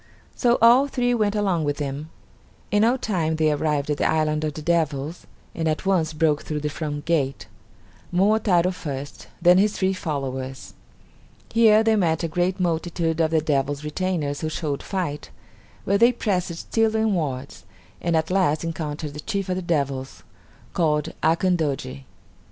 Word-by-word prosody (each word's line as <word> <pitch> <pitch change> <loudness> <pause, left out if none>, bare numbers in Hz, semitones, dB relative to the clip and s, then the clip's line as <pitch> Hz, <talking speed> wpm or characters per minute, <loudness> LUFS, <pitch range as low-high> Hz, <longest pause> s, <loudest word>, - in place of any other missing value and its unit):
So 240 -2 +3
all 245 +4 +7
three 245 -3 0
went 215 -3 +1
along 190 -6 +1
with 145 -1 -1
him. 145 +1 -4 0.6
In 205 +1 +3
no 235 +4 +3
time 170 -9 -1
they 155 -1 +2
arrived 150 -1 0
at 145 - 0
the - - +1
island 155 -1 +1
of 150 -1 -2
the 155 - -6
devils, 160 -1 -1 0.3
and 165 -1 -2
at 155 +4 -1
once 175 -5 +2
broke 155 -1 +1
through 150 -1 -4
the 150 - -1
front 145 -1 -4
gate; 140 -5 0 0.7
Momotaro 185 -1 +3
first; 145 -6 -7 0.2
then 180 +1 +7
his 210 +1 +3
three 190 0 +1
followers. 135 -6 -5 0.8
Here 220 -1 +6
they 225 0 +3
met 170 -5 +1
a - - +1
great 180 +3 -1
multitude 165 -1 -1
of 160 - +2
the 160 -1 +2
devils' 145 -1 -1
retainers 150 -2 -2
who 155 - -1
showed 150 -3 -3
fight, 175 -7 -4 0.6
but 200 +1 +2
they 235 +2 +6
pressed 185 -7 -1
still 225 +5 0
inwards, 160 -12 -1 0.4
and 170 -1 0
at 160 +2 -1
last 180 -5 +2
encountered 155 -2 -4
the 150 - -8
chief 200 +2 -3
of 180 - 0
the 185 - -3
devils, 140 -6 -2 0.5
called 155 -2 0
Akandoji. 155 - 0
165 Hz, 165 wpm, -23 LUFS, 150-190 Hz, 0.8 s, all